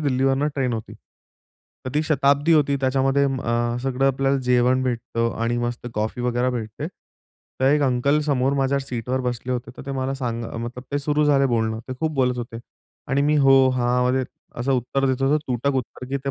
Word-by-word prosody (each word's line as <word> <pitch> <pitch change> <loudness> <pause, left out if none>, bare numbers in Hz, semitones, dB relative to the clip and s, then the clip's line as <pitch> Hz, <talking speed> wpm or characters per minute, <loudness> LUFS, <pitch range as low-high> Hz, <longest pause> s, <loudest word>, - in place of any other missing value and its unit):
दिल्लीवरनं 135 0 +1
train 130 -3 0
होती. 110 -1 -5 0.9
तर 130 - -4
ती 150 - +2
शताब्दी 145 0 +2
होती. 145 -3 +3
त्याच्यामध्ये 135 +1 +2
अ, 120 -3 0
सगळं 135 0 0
आपल्याला 135 +1 +1
जेवण 125 +1 +3
भेटतं 115 -2 -1
आणि 120 +1 0
मस्त 120 0 -3
कॉफी 110 +4 -2
वगैरे 125 +1 0
भेटते. 110 -3 -4 0.7
तर - - +2
एक 150 - +3
अंकल 140 +3 +2
समोर 135 -2 +1
माझ्या 140 0 +1
सीटवर 130 -1 -3
बसले 125 0 -3
होते. 120 -1 -4
तर - - -8
ते - - -4
मला 135 0 -2
सांग 120 -3 -3 0.2
मतलब 125 +1 -7
ते 145 - +1
सुरू 150 +1 +1
झाले 140 -2 +4
बोलणं. 110 -3 0
ते 130 - -3
खूप 160 -1 0
बोलत 125 -2 +1
होते. 120 -1 -6 0.5
आणि 140 +1 +2
मी, 150 +1 +3
"हो, 135 -2 +6
हां" 125 0 +2
मध्ये 130 +1 +1 0.4
असं 135 +3 +1
उत्तर 135 +2 0
देत 130 0 0
होतो, 140 +3 +3
तुटक 130 +2 0
उत्तर, 125 0 -5
की 140 - -1
ते 140 - 0
130 Hz, 190 wpm, -23 LUFS, 120-140 Hz, 0.9 s, हो